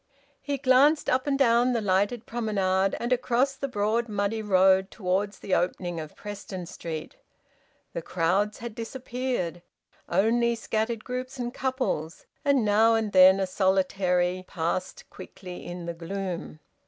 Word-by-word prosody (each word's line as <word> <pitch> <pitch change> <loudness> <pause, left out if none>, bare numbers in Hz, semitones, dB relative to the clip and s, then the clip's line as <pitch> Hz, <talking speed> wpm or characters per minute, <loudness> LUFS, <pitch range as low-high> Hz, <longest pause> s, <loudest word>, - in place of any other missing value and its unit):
He 285 -1 -2
glanced 275 +4 +4
up 260 +2 +1
and 275 -1 +1
down 245 -1 +4
the 235 - +1
lighted 205 +3 0
promenade, 195 -4 0
and 240 +2 0
across 250 +2 +1
the 275 +1 -4
broad 225 0 0
muddy 205 +2 -1
road 190 -1 +4
towards 195 +1 -1
the 190 - -4
opening 175 -1 0
of 155 -1 -8
Preston 200 -3 -7
Street. 165 - -7 0.8
The - - -3
crowds 190 - 0
had 235 -1 -7
disappeared; 240 -6 -4 0.5
only 235 +6 +2
scattered 225 0 -2
groups 255 +1 -5
and 240 -1 -4
couples, 255 - -2 0.2
and 280 -5 +3
now 220 +2 +4
and 220 -2 -1
then 190 0 +7
a 190 - +1
solitary, 185 -1 +1
passed 170 +1 -3
quickly 180 -2 -10
in 175 0 -7
the 170 - -3
gloom. 175 -2 -5
205 Hz, 140 wpm, -27 LUFS, 185-240 Hz, 0.8 s, then